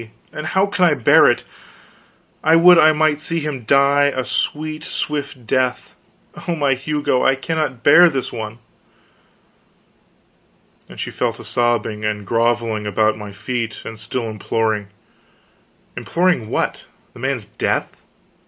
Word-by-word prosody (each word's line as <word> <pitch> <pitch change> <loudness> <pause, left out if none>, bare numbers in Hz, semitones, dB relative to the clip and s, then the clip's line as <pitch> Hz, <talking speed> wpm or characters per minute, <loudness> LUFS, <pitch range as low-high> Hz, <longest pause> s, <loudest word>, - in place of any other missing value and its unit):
And 155 +1 -5
how 190 +3 +2
can 200 -2 -1
I 160 -4 +3
bear 125 - +5
it? - - 0 1.0
I 160 - +5
would 175 +1 +7
I 155 - +6
might 155 -1 +1
see 165 +1 -1
him 145 -6 -5
die 140 +3 +4
a 130 -3 -1
sweet, 155 +1 -3
swift 145 -6 -4
death; 125 +1 -1 0.5
oh, 170 - 0
my 145 -3 +1
Hugo, 135 -1 -1
I 135 - +3
cannot 135 -3 -3
bear 175 +4 +7
this 135 -5 -4
one!" 110 -1 -6 2.3
And - - -12
she - - -4
fell - - -1
to - - -12
sobbing 115 -3 -1
and 105 -1 -2
grovelling 115 -1 0
about 110 +1 +1
my 105 -1 -9
feet, 115 +2 -5
and 110 -1 -8
still 115 +2 -4
imploring. 110 0 -2 1.1
Imploring 170 -11 0
what? - - -2 0.3
The - - -14
man's - - -2
death? - - -3
130 Hz, 140 wpm, -19 LUFS, 110-155 Hz, 2.3 s, would